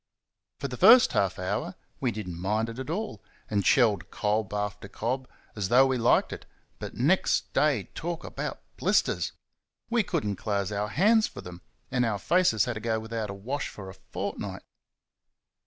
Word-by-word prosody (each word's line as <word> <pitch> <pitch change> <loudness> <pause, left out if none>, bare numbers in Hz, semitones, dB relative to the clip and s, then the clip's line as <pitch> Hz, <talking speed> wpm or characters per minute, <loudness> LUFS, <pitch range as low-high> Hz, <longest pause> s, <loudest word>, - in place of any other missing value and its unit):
For 140 - -2
the 125 -2 -6
first 240 - +7
half 95 -2 +1
hour 95 +3 -3 0.2
we 130 - +1
did 105 -3 -6
n't 90 - -5
mind 105 +5 0
it 115 +2 -7
at 130 - -5
all, 215 +7 -3 0.3
and 100 -2 +1
shelled 110 -7 +3
cob 105 -2 -1
after 105 0 -3
cob 125 +5 -3 0.3
as 100 -3 -2
though 130 +3 +6
we 130 -2 0
liked 115 - +3
it; - - -9 0.3
but - - -7
next 155 +11 +2
day, 145 -9 +2
talk 170 0 -4
about - - -5
blisters! - - +1 0.6
we 235 -1 +4
could 180 - -2
n't 100 -2 -2
close 100 -2 -1
our 105 +1 -1
hands 215 - +4
for - - -9
them, 90 0 -10 0.3
and 125 -1 +2
our 115 -4 0
faces 115 - +3
had 120 - -2
to 110 - -5
go 110 0 -1
without 110 -1 -4
a 100 - -5
wash 130 +8 -3
for 95 -2 -9
a - - -12
fortnight. 95 - -6
110 Hz, 185 wpm, -28 LUFS, 100-135 Hz, 0.6 s, first